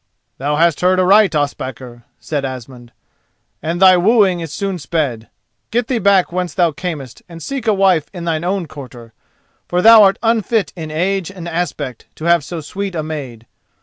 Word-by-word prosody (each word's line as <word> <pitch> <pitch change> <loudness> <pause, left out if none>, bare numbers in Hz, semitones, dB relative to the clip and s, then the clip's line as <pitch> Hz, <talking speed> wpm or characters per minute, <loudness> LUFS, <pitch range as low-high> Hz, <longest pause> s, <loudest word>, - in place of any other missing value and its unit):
"Thou 145 +3 -1
hast 165 0 +2
heard 185 +1 +3
aright, 195 -1 +4
Ospakar," 130 -4 -4
said 145 -3 -3
Asmund, 125 -2 -8 0.7
"and 165 +2 -3
thy 185 -1 +7
wooing 195 -1 +3
is 165 -3 -6
soon 195 +1 -3
sped. 130 -7 -3 0.4
Get 240 0 -1
thee 250 -3 0
back 195 -3 +3
whence 180 -3 -3
thou 175 -3 +2
camest 145 -6 -6
and 165 -1 -10
seek 260 - -5
a 215 - +4
wife 190 -6 +2
in 175 -3 -8
thine 165 -1 -1
own 185 0 -1
quarter, 125 -6 -11 0.5
for 180 +1 0
thou 225 -1 +9
art 195 -1 +5
unfit 225 -2 +1
in 160 -3 -6
age 180 +3 -1
and 180 -3 -9
aspect 155 -7 -4
to 155 - -8
have 170 -2 +3
so 165 +2 -6
sweet 195 +4 -5
a 155 - -2
maid. 135 -7 -7
170 Hz, 180 wpm, -17 LUFS, 145-190 Hz, 0.7 s, thou